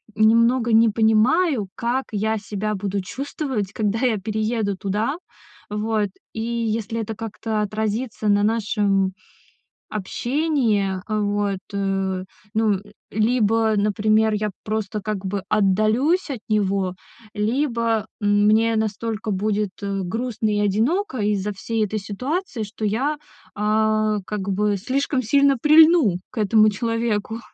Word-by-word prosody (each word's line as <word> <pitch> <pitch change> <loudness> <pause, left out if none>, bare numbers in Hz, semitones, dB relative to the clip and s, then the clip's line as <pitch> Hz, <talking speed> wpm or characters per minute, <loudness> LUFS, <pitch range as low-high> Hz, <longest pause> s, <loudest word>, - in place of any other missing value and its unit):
немного 230 +3 +4
не 225 +1 +6
понимаю, 225 - +3
как 245 +3 -1
я 220 +1 0
себя 210 0 -3
буду 200 0 -2
чувствовать, 260 -2 -4
когда 215 0 -1
я 245 -3 +2
перееду 215 0 -1
туда. 210 - -1 0.5
Вот. 210 0 -1 0.2
И 220 - -4
если 230 -1 -2
это 220 0 -4
как-то 220 0 -3
отразится 215 +2 -2
на 205 0 +4
нашем 205 -3 +1 0.8
общении 220 -3 0
вот, 205 -2 0
э, 195 -2 -1 0.3
ну, 220 -1 +3 0.4
либо, 225 0 +2
например, 215 +1 +2
я 210 0 -1
просто 215 -1 -2
как 205 -1 -4
бы 195 +1 -2
отдалюсь 215 - +2
от 255 -5 -4
него, 195 -3 0 0.4
либо 230 -1 0
мне 210 +2 +3
настолько 220 0 -2
будет, 205 +1 0
э, 200 -1 -2
грустно 225 +3 -2
и 205 - +1
одиноко 250 - 0
из-за 205 -1 0
всей 220 +3 -2
этой 215 +2 -3
ситуации, 250 - -3
что 215 +1 -7
я, 255 +9 0 0.4
а, 215 0 +1
как 210 -2 -3
бы, 205 +1 +1
слишком 260 +6 -1
сильно 280 +4 +3
прильну 305 - +6
к - - -19
этому 215 +1 +4
человеку. 230 0 -2
215 Hz, 120 wpm, -22 LUFS, 205-230 Hz, 0.8 s, не